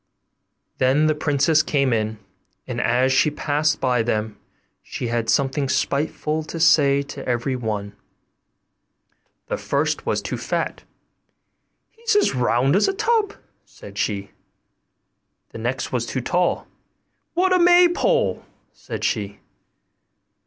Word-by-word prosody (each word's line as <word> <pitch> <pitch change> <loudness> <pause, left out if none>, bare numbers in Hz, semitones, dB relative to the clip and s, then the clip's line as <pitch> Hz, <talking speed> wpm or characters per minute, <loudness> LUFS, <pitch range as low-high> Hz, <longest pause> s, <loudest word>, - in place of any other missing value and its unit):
Then 135 +4 +3
the 155 - +3
princess 150 +1 +2
came 140 -5 +1
in, 110 -1 -1 0.5
and - - -3
as 130 +2 +2
she 150 - +4
passed 150 +1 0
by 125 -3 +1
them 110 -2 -2 0.5
she 120 - -5
had 115 -1 -1
something 135 0 +1
spiteful 150 +3 -1
to 160 +1 -7
say 140 -4 +4
to 140 -1 -8
every 125 +2 -1
one. 105 -4 -4 1.5
The - - -3
first - - -1
was - - 0
too - - -4
fat: - - -3 1.1
'He's 455 -1 -2
as 415 - +3
round 125 +3 +2
as 200 - +3
a 390 - 0
tub,' 435 0 0 0.3
said - - -14
she. 100 -2 -2 1.2
The - - -9
next 125 +3 -3
was 120 -3 -1
too 130 - -2
tall: 175 +7 0 0.7
'What 370 +2 +3
a 365 - +4
maypole!' 355 +8 +4 0.3
said - - -7
she. 100 -3 -2
140 Hz, 125 wpm, -22 LUFS, 120-165 Hz, 1.5 s, she